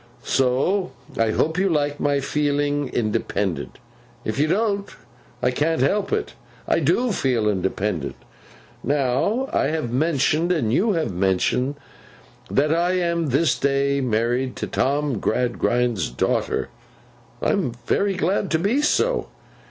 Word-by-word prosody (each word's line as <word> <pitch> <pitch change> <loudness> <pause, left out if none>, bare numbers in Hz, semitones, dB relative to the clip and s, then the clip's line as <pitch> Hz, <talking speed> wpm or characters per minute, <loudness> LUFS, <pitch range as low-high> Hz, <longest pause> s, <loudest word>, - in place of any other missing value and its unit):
So, 140 +9 +1 0.2
I 115 -1 +2
hope 160 +10 0
you 195 0 +2
like 145 -3 0
my 145 -1 +1
feeling 145 0 0
independent; 105 -5 -2 0.5
if 110 +5 -2
you 150 - +3
don't, 200 +2 0 0.5
I - - +3
can't 150 +2 +1
help 200 +9 +1
it. 430 0 -1 0.3
I - - +2
do 245 -1 +2
feel 125 - +1
independent. 95 -5 -1 0.7
Now 145 - +1
I - - +2
have 155 -7 -2
mentioned, 155 +4 +1
and 120 -11 +1
you 205 - +2
have 160 - -1
mentioned, 95 +9 +1 0.7
that 150 +3 +2
I 175 +2 +1
am 170 -3 0
this 140 +3 +2
day 140 0 +1
married 120 +2 0
to - - -3
Tom 140 -3 0
Gradgrind's 120 - 0
daughter. - - -1 0.7
I - - +1
am 120 - 0
very 200 +7 +1
glad 185 +3 0
to 160 - +2
be 205 - +1
so. 460 +9 +1
145 Hz, 135 wpm, -23 LUFS, 125-170 Hz, 0.7 s, you